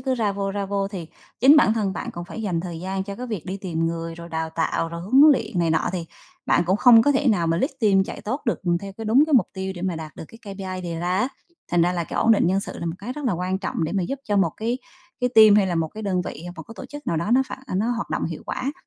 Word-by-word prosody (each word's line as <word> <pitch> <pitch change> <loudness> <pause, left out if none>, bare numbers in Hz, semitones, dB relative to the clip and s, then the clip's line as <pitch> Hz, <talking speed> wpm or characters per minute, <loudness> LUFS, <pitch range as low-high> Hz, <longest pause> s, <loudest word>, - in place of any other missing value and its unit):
cứ 260 +1 0
ra 220 -5 0
vô, 195 0 -2
ra 200 0 -3
vô 195 0 -1
thì 185 -5 -6 0.3
chính 275 +5 +8
bản 225 - +5
thân 210 -4 -1
bạn 175 - -5
còn 175 0 -7
phải 220 +5 -7
dành 180 -5 -1
thời 170 -2 -6
gian 190 +1 -3
cho 200 0 -6
cái 250 - -6
việc 215 -9 -5
đi 190 +2 -3
tìm 165 -4 -2
người, 165 0 -4
rồi 170 0 -10
đào 160 -1 -3
tạo, 165 0 -1
rồi 170 0 -6
huấn 255 - +5
luyện 225 -8 -2
này 170 -1 +2
nọ 160 - +1
thì 175 -2 -3 0.4
bạn - - +3
cũng 190 +2 +3
không 230 +1 +7
có 285 - +3
thể 275 0 +2
nào 180 -7 +2
mà 165 0 +1
lead 265 - 0
team 195 -3 +4
chạy - - -7
tốt 260 +8 -3
được 230 - 0 0.2
theo 195 -1 -7
cái 225 - -6
đúng 230 +6 +5
cái 315 - -3
mục 245 -9 +5
tiêu 190 -1 -4
để 175 - -8
mà 185 -3 -1
đạt 155 -1 -8
được - - -7
cái 215 -3 -10
KPI 185 -1 -5
đề 170 -2 -4
ra 180 +2 0
á. 255 - +1 0.4
Thành 175 -1 +3
ra 175 +1 +2
là 175 -1 -2
cái - - -7
ổn 225 - +5
định 205 - +3
nhân 190 +3 +2
sự - - -7
là 170 - -4
một 165 - -2
cái 235 +6 -5
rất 295 0 -7
là 240 - +1
quan 180 +2 -2
trọng 185 -3 -2
để 160 - -3
mà 195 - 0
giúp 270 +9 -3
cho 205 -1 0
một 195 - +2
cái 235 +3 -2 0.4
cái 250 - +2
team 215 -2 +8
hay 200 - +4
là 180 - -1
một 165 -1 0
cái 215 +5 -9
đơn 185 -3 0
vị, 155 - -7
hoặc 175 - -6
một 165 - -7
cái 225 - -12
tổ - - -8
chức 290 +2 -10
nào 170 - 0
đó 170 +7 -2
nó 265 +2 +5
phản - - -6 0.2
nó 220 +5 +1
hoạt 235 -1 -3
động - - -1
hiệu 165 -1 -5
quả, 270 +3 -3
195 Hz, 320 wpm, -23 LUFS, 170-225 Hz, 0.4 s, chính